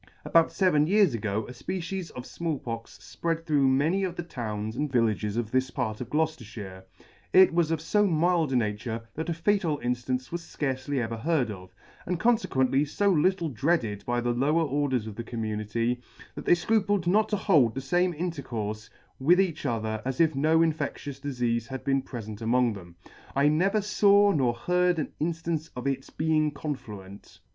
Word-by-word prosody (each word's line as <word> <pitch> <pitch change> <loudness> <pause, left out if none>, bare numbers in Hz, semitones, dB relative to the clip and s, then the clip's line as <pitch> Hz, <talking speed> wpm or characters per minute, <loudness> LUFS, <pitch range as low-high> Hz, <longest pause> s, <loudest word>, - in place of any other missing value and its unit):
— - - -33
About 165 -1 +5
feven 155 -6 +2
years 200 - +4
ago 105 -1 -2
a - - -8
fpecies 180 +6 -4
of 125 - -7
Small 165 -3 -3
Pox 115 -2 -7 0.2
fpread 165 -1 -1
through 145 -4 +3
many 155 +9 +2
of 180 -2 -2
the 175 - -4
towns 110 -8 -5
and 145 +1 -2
villages 110 -3 +1
of 115 -2 -2
this 130 0 +1
part 110 -4 -3
of 125 - -6
Gloucefterfhire: 115 -11 -3 0.5
it 185 -2 +7
was 170 -2 +2
of 165 -1 0
fo 205 +6 +2
mild 165 -2 +2
a - - +1
nature, 115 0 -2
that 160 +2 -4
a - - +1
fatal 170 -3 +1
inftance 125 0 -2
was 170 0 -3
fcarcely 135 -3 -3
ever 115 -1 -3
heard 135 -2 0
of, 90 -2 -11 0.3
and 180 -1 -1
confequently 145 - +2
fo 200 +7 +1
little 175 +1 +2
dreaded 120 - 0
by 120 0 +1
the 120 0 0
lower 150 +7 +2
orders 140 -5 0
of 110 -2 -7
the 115 - -4
community, 115 +1 -2 0.3
that - - -8
they - - +6
fcrupled 205 +1 +1
not 210 +5 +3
to 210 - 0
hold 145 - +3
the - - -2
fame 175 +7 +1
intercourfe 120 - -4 0.3
with 170 +7 +4
each 170 -6 0
other 110 -3 -2
as 130 0 -3
if 160 -2 +4
no 155 +4 +3
infectious 145 -3 -3
difeafe 120 -5 -1
had 130 -1 -6
been 135 -1 +1
prefent 110 -5 -8
among 120 +1 +2
them. 90 -4 -11 0.4
I 140 +2 +4
never 195 +8 +2
faw 205 0 +4
nor 130 -8 +1
heard 180 +2 +1
of 155 - 0
an - - -18 0.2
inftance 165 -1 -4
of 125 - -6
its 135 -1 -2
being 155 -1 +1
confluent. 105 -10 -7
140 Hz, 185 wpm, -27 LUFS, 115-170 Hz, 0.5 s, it